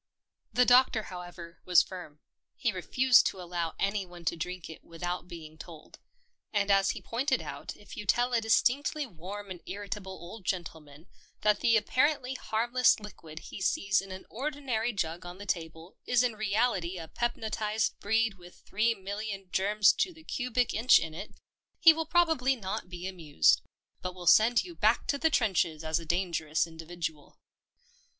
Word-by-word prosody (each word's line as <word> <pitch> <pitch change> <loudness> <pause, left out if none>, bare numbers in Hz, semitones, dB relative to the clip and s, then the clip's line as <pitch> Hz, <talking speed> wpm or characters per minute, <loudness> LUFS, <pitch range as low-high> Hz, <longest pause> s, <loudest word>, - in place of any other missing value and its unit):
The 250 0 +4
Doctor, 245 -3 +5
however, 175 -2 -9
was 180 -2 +5
firm. 175 -5 -10 0.3
He 235 -4 0
re 185 -2 -5
fused 255 +5 +5
to 190 - -5
allow 175 -2 -3
anyone 190 -4 -3
to 165 - +1
drink 180 +1 -5
it 160 - -11
without 175 +2 -5
being 160 -3 -10
told, 160 -2 -12 0.5
and 205 -1 +1
as 195 0 +4
he - - -3
pointed 260 +3 0
out - - -7
if 210 - -12
you 210 - -7
tell 245 +3 +2
a 230 - +3
distinctly 275 +6 +2
warm 200 0 -8
and 175 -2 -7
irritable 200 0 -5
old 185 +4 -10
gentle 175 -3 -3
man 145 +2 -16 0.4
that 210 -1 +3
the 230 -1 +4
apparently 260 +4 +1
harmless 240 0 +2
liquid 165 -7 -11
he - - -7
sees 195 +1 +2
in 195 -1 -11
an 185 0 -8
ordinary 260 -3 -2
jug 175 -4 -3
on 175 +1 -9
the 205 - -9
table 165 -1 -4
is 245 0 +4
in 245 -2 +1
reality 210 -4 0
a 165 -2 -7
pepnotised 220 -1 -1
breed 220 -1 +1
with 175 0 -14
three 230 +3 0
million 195 -1 -6
germs 205 +1 +4
to 365 - 0
the 320 -2 -16
cubic 250 -4 -1
inch 230 +4 +6
in 160 -1 -3
it 195 +6 -8 0.2
— - - -52
he 325 - +11
will 320 0 -3
probably 320 -7 +3
not 190 -5 -5
be 180 0 -7
amused, 160 - +2 0.4
but 180 0 -5
will 180 -1 -9
send 225 +7 +6
you 355 - -9
back 220 -6 +2
to 280 - -1
the 320 - +3
trenches 180 - +1
as 160 +1 0
a 165 - -9
dangerous 165 -3 0
individual. 165 -2 -7
195 Hz, 175 wpm, -29 LUFS, 175-235 Hz, 0.5 s, he